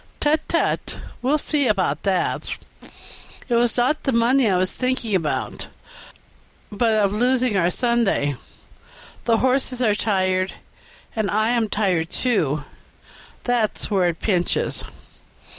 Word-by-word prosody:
"Tut, 300 +1 +3
tut! 335 - 0 0.2
we'll 275 +5 +2
see 290 -2 0
about 185 -9 +1
that. 190 -3 -1 1.0
It 245 - -1
was 235 0 +2
not 255 +6 +2
the 270 - 0
money 235 +1 +3
I 185 - +2
was 185 0 +1
thinking 255 -4 -1
about, 165 -5 -2 1.0
but 225 +2 +1
of 205 -2 +2
losing 250 0 +2
our 175 -2 +3
Sunday; 230 - +1 0.9
the 230 -1 +3
horses 255 0 +1
are 225 -4 +3
tired, 185 -3 0 0.6
and 220 -2 0
I 215 +2 +1
am 235 -3 +1
tired, 185 -6 0
too 155 - 0 0.8
that's 235 -3 -1
where 185 -3 +3
it 165 - -5
pinches." 180 -5 0
220 Hz, 125 wpm, -22 LUFS, 185-245 Hz, 1.0 s, Tut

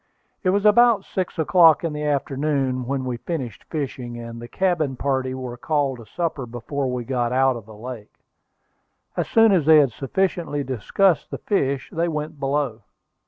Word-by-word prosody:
It 185 - +1
was 200 +2 +1
about 215 -1 +5
six 185 -1 -3
o'clock 165 0 +5
in 165 -2 -2
the 150 - -4
afternoon 135 -3 -1
when 135 -1 -2
we 125 -2 -3
finished 130 - -5
fishing, 130 -6 -5
and 115 0 -8
the 120 - -8
cabin 165 -5 0
party 130 -1 -1
were 125 -2 -6
called 140 -1 -1
to 115 - -12
supper 155 - -3
before 125 +3 -3
we 125 -1 -3
got 120 -1 -1
out 130 0 +3
of 115 -3 -9
the 110 - -12
lake. 115 -2 -9 1.0
As - - -1
soon 225 -1 +5
as 170 -6 +2
they 160 -1 +8
had 140 -4 +4
sufficiently 145 +3 -1
discussed 145 - +1
the - - -5
fish, 140 - -1
they 170 +1 0
went 155 -1 -4
below. 135 -4 -1
140 Hz, 175 wpm, -23 LUFS, 125-165 Hz, 1.0 s, they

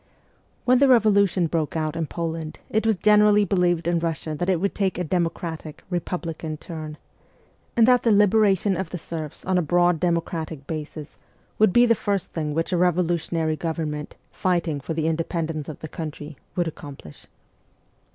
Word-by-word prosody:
When 255 0 +5
the 280 - +5
revolution 200 -7 +4
broke 160 -2 -1
out 155 0 -2
in 165 -1 -2
Poland 165 -1 -4
it 220 +1 +1
was 220 - +3
generally 210 +1 +5
believed 175 -4 +1
in 170 -1 +2
Russia 165 -1 -3
that 175 +4 -2
it 180 -3 +2
would 200 +3 -1
take 195 -2 -1
a 180 - -1
demo 170 0 +1
cratic, 160 -3 -7
republican 165 -3 -3
turn; 155 -2 -7 0.8
and 230 0 +6
that 250 -1 +5
the 230 - +2
liberation 205 -1 +4
of 180 -1 -3
the 180 - -5
serfs 160 -2 -7
on 185 -1 +2
a - - +2
broad 175 +1 +2
democratic 165 -4 -2
basis 155 -1 -7 0.4
would 215 -3 +5
be 240 +5 +6
the 230 - +5
first 200 -4 -2
thing 150 -2 -2
which 165 +3 -1
a - - +2
revolutionary 170 -2 +1
government, 155 -2 -4 0.2
fighting 170 -5 0
for 155 +4 -5
the 160 -1 -1
independence 165 -1 -2
of 155 - -8
the 160 - -5
country, 155 -1 -7 0.2
would 175 -2 0
accomplish. 140 - -10
170 Hz, 170 wpm, -24 LUFS, 155-190 Hz, 0.8 s, and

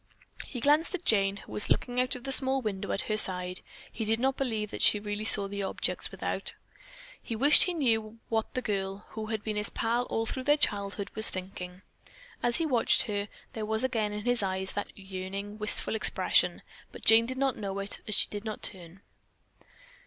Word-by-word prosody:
He 250 - -6
glanced 300 +7 +3
at 360 - -8
Jane, 195 -2 +3
who 200 - -7
sat - - -1
looking 245 0 0
out 255 0 -1
of 250 - -9
the 270 - -4
small 265 0 +4
window 200 -3 -3
at - - -1
her 215 - -2
side. 180 -2 +1 0.3
He 225 - -4
did 220 +1 0
not 265 +2 +1
believe 220 -6 -2
that - - -6
she 210 - +6
really 205 +1 -4
saw 200 -2 +4
the 200 0 -5
objects 195 - -2
without. - - -2 0.2
How - - -29 0.4
he 230 - -5
wished 285 +6 +6
he 360 - -2
knew 225 -6 0
what 220 -1 -1
the 255 - -2
girl, 195 -2 -3
who 220 -1 -6
had 220 -2 -4
been 215 -1 -3
his 210 0 -2
pal 235 +2 -1
all 225 -2 -2
through 255 +3 -4
their 295 +1 +4
childhood, 200 -6 -1
was 220 0 +4
thinking. 185 0 -7 0.6
As 240 -1 +2
he 330 - 0
watched 250 -7 +3
her, 205 -3 -3 0.3
there 220 - -5
was 220 +2 -1
again 225 -5 0
in 210 0 -6
his 245 -1 +1
eyes 190 -1 -3
that 205 - -4
yearning, 195 +2 -7
wistful 210 +1 +6
expression, 220 - +1 0.3
but - - -12
Jane 225 +1 +6
did 260 +1 -5
not 270 -1 +1
know 195 -2 -4
it 200 0 -2
as 210 - +1
she - - +4
did 205 0 -5
not 215 -1 -6
turn. 180 -1 -2
215 Hz, 210 wpm, -29 LUFS, 200-245 Hz, 0.6 s, she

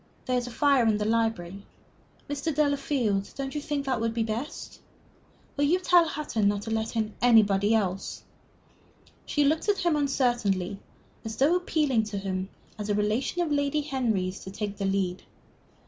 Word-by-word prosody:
There 255 - 0
is 245 0 -1
a - - -7
fire 275 -2 +3
in 215 -1 +3
the 210 - -2
library. 215 -4 -1 0.6
Mr. 290 +3 -2
Delafield, 275 -9 +1
don't 270 -1 -4
you 300 - -3
think 290 -2 -3
that 255 -4 -1
would 230 0 -1
be 230 - +1
best?... 225 +6 -5 0.7
Will 290 - +2
you 335 +5 +3
tell 355 -2 +4
Hutton 285 -9 -1
not 205 0 0
to 225 - -5
let 220 +1 -2
in 220 -1 -1
anybody 215 -3 +5
else?" 195 -3 -2 1.0
She 295 - +2
looked 310 +7 +1
at 405 - +3
him 340 -3 +3
uncertainly, 240 -10 0 0.4
as 220 -1 -5
though 285 +9 +3
appealing 305 -9 +1
to 210 -1 -5
him, 190 -1 -3 0.3
as 210 0 -4
a 205 - +2
relation 215 +12 0
of 320 - -3
Lady 285 +1 +1
Henry's, 225 -10 -1
to - - -9
take 205 +1 -5
the 200 - -2
lead. 190 -2 -1
230 Hz, 175 wpm, -27 LUFS, 205-285 Hz, 1.0 s, anybody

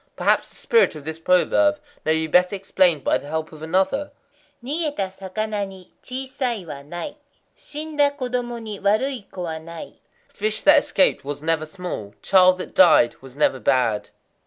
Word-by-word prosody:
Perhaps - - +1
the - - -15
spirit 460 - +2
of 150 - -9
this 160 +2 -5
proverb 300 - +3 0.3
may 155 +1 +3
be 160 0 0
better 180 +5 +3
explained 185 -5 +2
by - - +2
the - - -12
help 160 +1 -3
of 155 -1 -12
another: 190 - 0 0.5
Nigéta 285 - -2
sakana 205 +2 -3
ni 190 -2 -14
chisai 255 -5 -4
wa 145 -3 -8
nai; 175 - -7 0.4
shinda 300 -1 -1
kodomo 245 -2 -3
ni 215 -3 -7
warui 215 +3 0
ko 180 - -6
wa 160 -2 -4
nai—"Fish 170 +6 -7
that 295 0 +7
escaped 285 -1 +2
was 145 +1 -6
never 160 -1 0
small; 165 - -7
child 185 -1 +5
that 185 - -7
died 170 -10 +5
was 135 -1 -13
never 140 -2 +2
bad." 120 -5 +1
190 Hz, 160 wpm, -22 LUFS, 160-245 Hz, 0.5 s, that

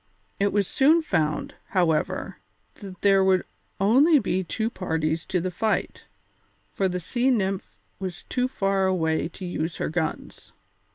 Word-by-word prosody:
It 200 0 +2
was 200 -2 +1
soon 315 +8 +4
found, 155 - -1
however, 165 -5 0 0.4
that 190 -4 -11
there 195 -1 +5
would 190 -1 +3 0.4
only 265 - +5
be 190 -8 0
two 220 +6 -2
parties 160 -4 -2
to 185 - 0
the 185 +2 -2
fight, 215 +4 -2 0.7
for 195 - +1
the 180 0 -2
Sea 245 +9 0
Nymph 195 -6 -1 0.2
was 185 -2 -6
too 250 0 -1
far 195 -5 0
away 160 -4 0
to 185 +2 -9
use 170 -2 -3
her - - -2
guns. 160 0 -4
190 Hz, 150 wpm, -25 LUFS, 175-210 Hz, 0.7 s, there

